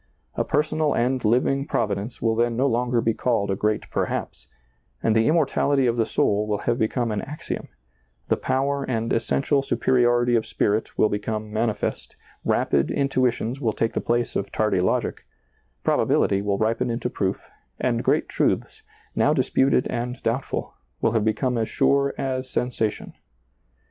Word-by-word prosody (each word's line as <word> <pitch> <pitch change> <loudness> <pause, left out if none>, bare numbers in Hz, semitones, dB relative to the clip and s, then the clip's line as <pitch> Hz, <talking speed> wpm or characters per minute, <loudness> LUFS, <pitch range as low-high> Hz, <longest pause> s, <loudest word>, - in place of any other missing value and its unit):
A - - 0
personal 150 0 +1
and 125 +1 0
living 130 +5 +2
Provi 105 -8 0
dence 100 +5 -6
will 115 -1 +3
then 115 +1 +1
no 130 - +2
longer 120 -2 +1
be 115 - +1
called 110 -4 0
a - - +1
great 105 +2 -1
Per - - +1
haps, - - -5 0.6
and 110 - +2
the 115 0 +3
immortaHty 145 -4 +2
of 120 - +1
the 115 -2 +1
soul 105 +1 +1
will 105 -1 0
have 120 0 +1
be 110 - +3
come 120 -1 -1
an 105 - -1
axiom, 150 +2 -6 0.6
the - - +3
power 140 +1 0
and 115 -3 -1
essential 140 +4 +1
superiority 120 -1 +2
of 110 - 0
spirit 105 +2 -1
will - - +4
become 105 +1 -3
manifest, 110 0 -2 0.3
rapid 70 0 +1
intuitions 130 -2 0
will 115 -4 +1
take 115 - -1
the - - -1
place 120 0 0
of 100 0 -2
tardy 105 -4 +1
logic, 90 - 0 0.6
probability 100 0 +2
will 100 -1 0
ripen 110 +2 0
into 120 +1 -2
proof, 95 -5 -3 0.3
and - - 0
great - - +2
truths, - - -1 0.3
now - - +3
disputed 130 -1 +2
and 125 +1 -4
doubtful, 120 +4 -2 0.3
will - - +2
have 110 -2 +1
become 120 +3 0
as 110 - -1
sure 140 0 +2
as 130 -1 -2
sensa 125 -3 0
tion. - - -11
120 Hz, 170 wpm, -24 LUFS, 110-130 Hz, 0.6 s, will